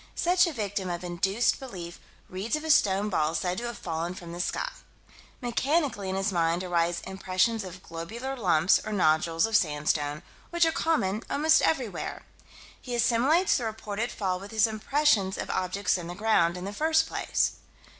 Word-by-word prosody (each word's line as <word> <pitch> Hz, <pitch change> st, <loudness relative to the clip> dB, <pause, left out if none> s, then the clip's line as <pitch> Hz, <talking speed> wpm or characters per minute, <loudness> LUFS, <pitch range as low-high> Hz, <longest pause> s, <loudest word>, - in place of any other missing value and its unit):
Such 360 Hz, +1 st, +3 dB
a -, -, -2 dB
victim 205 Hz, -7 st, -3 dB
of 175 Hz, 0 st, -4 dB
induced 190 Hz, +6 st, +1 dB
belief 180 Hz, -10 st, -8 dB, 0.3 s
reads 195 Hz, +9 st, -2 dB
of 305 Hz, -, -4 dB
a 315 Hz, -, +1 dB
stone 205 Hz, -6 st, +3 dB
ball 155 Hz, -4 st, 0 dB
said 180 Hz, +1 st, -1 dB
to 240 Hz, -, -5 dB
have 240 Hz, -2 st, -5 dB
fallen 170 Hz, +1 st, -3 dB
from 175 Hz, -2 st, -9 dB
the 175 Hz, +1 st, -4 dB
sky. -, -, -2 dB, 0.7 s
Mechanically 250 Hz, -, 0 dB
in 190 Hz, -, -2 dB
his 195 Hz, +1 st, 0 dB
mind 170 Hz, 0 st, +1 dB
arise 170 Hz, -1 st, 0 dB
impressions 190 Hz, +3 st, 0 dB
of 185 Hz, -1 st, -9 dB
globular 225 Hz, +11 st, -6 dB
lumps, 180 Hz, -7 st, +3 dB
or 215 Hz, -, -5 dB
nodules, 165 Hz, -2 st, +2 dB
of 225 Hz, -1 st, -1 dB
sandstone, 150 Hz, -2 st, 0 dB, 0.3 s
which 340 Hz, -1 st, +3 dB
are 325 Hz, -, +2 dB
common 220 Hz, -13 st, 0 dB
almost 310 Hz, +2 st, +4 dB
everywhere. 255 Hz, -9 st, -1 dB, 0.6 s
He 245 Hz, -2 st, -4 dB
assimilates 255 Hz, +10 st, +3 dB
the 245 Hz, -, -3 dB
reported 220 Hz, +1 st, -3 dB
fall 185 Hz, -3 st, -2 dB
with 200 Hz, +2 st, -9 dB
his 220 Hz, 0 st, +3 dB
impressions 220 Hz, -2 st, +1 dB
of -, -, -4 dB
objects 185 Hz, +1 st, 0 dB
in 170 Hz, -, -7 dB
the 175 Hz, -, -6 dB
ground, 180 Hz, -4 st, +2 dB
in 180 Hz, -, -6 dB
the 200 Hz, -, -5 dB
first 315 Hz, +6 st, +2 dB
place. -, -, -1 dB
200 Hz, 175 wpm, -27 LUFS, 175-240 Hz, 0.7 s, almost